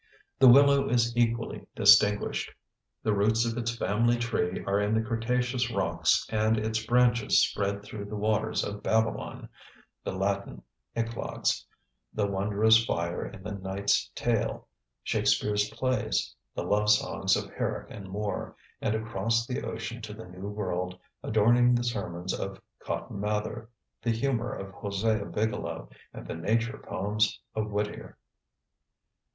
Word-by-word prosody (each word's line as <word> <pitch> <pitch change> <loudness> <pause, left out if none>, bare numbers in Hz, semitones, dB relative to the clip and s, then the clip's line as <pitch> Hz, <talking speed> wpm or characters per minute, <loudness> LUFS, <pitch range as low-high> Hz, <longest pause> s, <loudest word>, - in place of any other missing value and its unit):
The 135 - +8
willow 140 +2 +7
is 120 -1 +2
equally 115 -1 0
distinguished. 105 0 +4 0.5
The 110 - +2
roots 110 +3 +2
of 115 -1 -1
its 115 -1 -2
"family 120 +3 +2
tree" 115 -6 -1
are 100 +1 +1
in 105 +2 +1
the 110 - +3
cretaceous 120 +2 0
rocks 115 - +1
and 110 0 +2
its 110 +1 -1
branches 120 0 +4
spread 100 0 -1
through 105 0 -7
the 105 +1 -6
waters 105 +1 0
of 100 0 -5
Babylon, 110 0 -1 0.6
the - - -3
Latin 95 -9 -2 0.3
eclogues, 115 0 -1 0.4
the 105 - 0
wondrous 105 +3 +3
fire 85 -4 -2
in 95 - -11
the 105 - -5
Knightes' 100 0 0
Tale, - - -1 0.4
Shakespeare's 105 0 +1
plays, 130 +2 -1 0.2
the - - -2
love 105 +1 +1
songs 105 - +3
of - - -4
Herrick - - -3
and 100 -3 -9
Moore, 105 +2 -3 0.3
and 110 - 0
across 115 +1 0
the 125 0 -3
ocean 115 +1 -5
to 105 -1 -7
the 110 - -9
New 90 +2 -8
World, 90 -3 -3 0.2
adorning 120 +3 +4
the 120 - +1
sermons 95 -6 -3
of 95 0 -4 0.2
Cotton 100 - -5
Mather, 105 +2 -2 0.3
the 120 - -1
humor 120 0 0
of 95 0 -6
Hosea 100 +1 -1
Bigelow, 85 - -3 0.2
and - - -9
the - - -5
nature 115 +8 -1
poems 105 +3 0
of 110 -1 -2
Whittier. 105 0 -4
110 Hz, 140 wpm, -28 LUFS, 100-115 Hz, 0.6 s, The